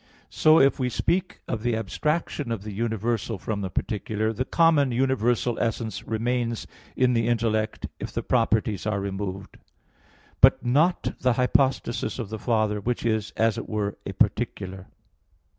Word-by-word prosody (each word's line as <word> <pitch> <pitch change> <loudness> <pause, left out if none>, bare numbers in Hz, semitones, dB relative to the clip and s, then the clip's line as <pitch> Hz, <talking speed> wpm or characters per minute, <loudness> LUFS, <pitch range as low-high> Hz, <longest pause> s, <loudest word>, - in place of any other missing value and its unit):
So, 155 +1 +5
if 140 +1 +4
we 125 -1 +1
speak 180 +9 -1
of 110 - -3
the 120 0 0
abstraction 145 - -2
of 110 -4 -3
the 105 - -6
universal 110 +1 -2
from 100 +2 -3
the 95 - -3
particular, 110 +3 -2
the 130 +4 -2
common 155 -4 +3
universal 120 -1 +1
essence 115 -3 -2
remains 115 +1 -1 0.3
in 125 -1 +3
the 115 -1 +1
intellect 110 -2 0
if - - -5
the - - -3
properties 110 -4 +1
are 105 -2 0
removed; 100 0 -5 0.8
but - - +6
not 155 +9 +2
the 125 -1 +2
hypostasis 125 -1 +1
of 115 -6 -5
the 110 0 -5
Father, 110 -3 0
which 120 +2 -2
is, 110 -2 0
as 110 -1 +2
it - - -8
were, 105 -2 -2
a - - -5
particular. 95 0 -1
115 Hz, 155 wpm, -25 LUFS, 105-125 Hz, 0.8 s, but